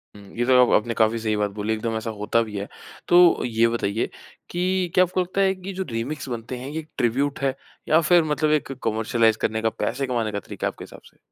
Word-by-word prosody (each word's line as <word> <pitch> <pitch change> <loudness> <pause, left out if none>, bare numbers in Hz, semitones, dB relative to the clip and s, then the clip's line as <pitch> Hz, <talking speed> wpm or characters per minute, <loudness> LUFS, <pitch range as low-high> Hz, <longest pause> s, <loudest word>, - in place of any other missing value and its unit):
हुँ, 105 - -12 0.2
ये 120 - +1
तो 125 0 +6
आप - - -3
आपने 120 - -4
काफ़ी 115 0 +2
सही 110 -1 -1
बात 105 -1 0
बोली 105 +2 -2
एकदम 110 +1 -2
ऐसा 110 +1 -4
होता 115 +2 +1
भी 105 -3 -5
है। 100 - -4 0.4
तो 175 -1 +6
ये 115 -1 +2
बताइए 115 -2 -1 0.4
कि 180 +1 0
क्या 185 - +7
आपको 185 +1 0
लगता 185 +2 -1
है 190 0 +3
कि 185 +1 -7
जो 190 +1 -3
रीमिक्स 125 +5 -4
बनते 120 +1 -5
हैं 130 +3 -7
ये 155 +1 -5
ट्रिब्यूट 135 +4 0
हैं 135 -1 0 0.4
या 160 +2 +5
फिर 170 +1 +4
मतलब 150 0 0
एक 150 -3 0
कमर्शियलाइज़ 110 0 +2
करने 110 0 0
का, 110 - +2
पैसे 125 +6 -3
कमाने 115 -4 -1
का 100 - -3
तरीका - - -5
है - - -2
आपके - - -11
हिसाब - - -13
से? - - -20
120 Hz, 240 wpm, -23 LUFS, 110-155 Hz, 0.4 s, क्या